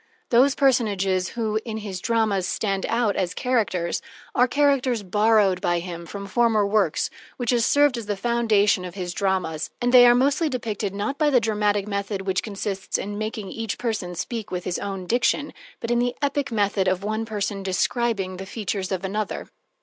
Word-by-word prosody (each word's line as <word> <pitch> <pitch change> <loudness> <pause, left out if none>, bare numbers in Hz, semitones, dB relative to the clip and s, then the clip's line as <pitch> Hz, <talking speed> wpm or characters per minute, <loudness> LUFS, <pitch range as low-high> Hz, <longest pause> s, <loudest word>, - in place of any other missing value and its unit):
Those 260 +3 +5
personages 200 -9 +2
who, 220 -2 0
in 220 -2 -5
his 200 -4 -5
dramas, 220 -5 +1
stand 195 -3 -1
out 230 -3 +1
as 180 -2 -1
characters, 210 -9 0 0.3
are 250 - +4
characters 265 -5 +2
borrowed 205 -1 +3
by 175 - +1
him 170 -1 -6
from 200 +2 -6
former 220 0 +2
works 200 -5 +1 0.3
which 245 -2 0
have 240 -2 +2
served 285 -1 +3
as 220 - -8
the 205 -1 -2
foundation 215 -4 +2
of 180 0 -7
his 180 -2 -4
dramas, 185 -6 -1
and 245 0 0
they 245 -1 +9
are 240 - +6
mostly 280 +5 +2
depicted, 215 -6 -3
not 210 +9 -3
by 305 -1 +4
the 260 -4 +5
dramatic 210 -2 0
method 200 -1 -3
which 190 -1 0
consists 195 -2 -3
in 205 +1 -5
making 215 -2 -4
each 225 -2 -4
person 210 -7 -3
speak 220 +5 -4
with 180 -1 -3
his 180 - -2
own 195 -2 -4
diction, 245 +7 +1 0.3
but 230 - -3
in 240 - +3
the 245 0 0
epic 280 -1 -1
method 200 -3 +1
of 185 +1 0
one 215 +2 -1
person 205 -2 -3
describing 195 0 -1
the 190 +1 -7
features 200 -2 -3
of 190 0 -2
another. 210 +2 -3
210 Hz, 185 wpm, -24 LUFS, 195-235 Hz, 0.3 s, they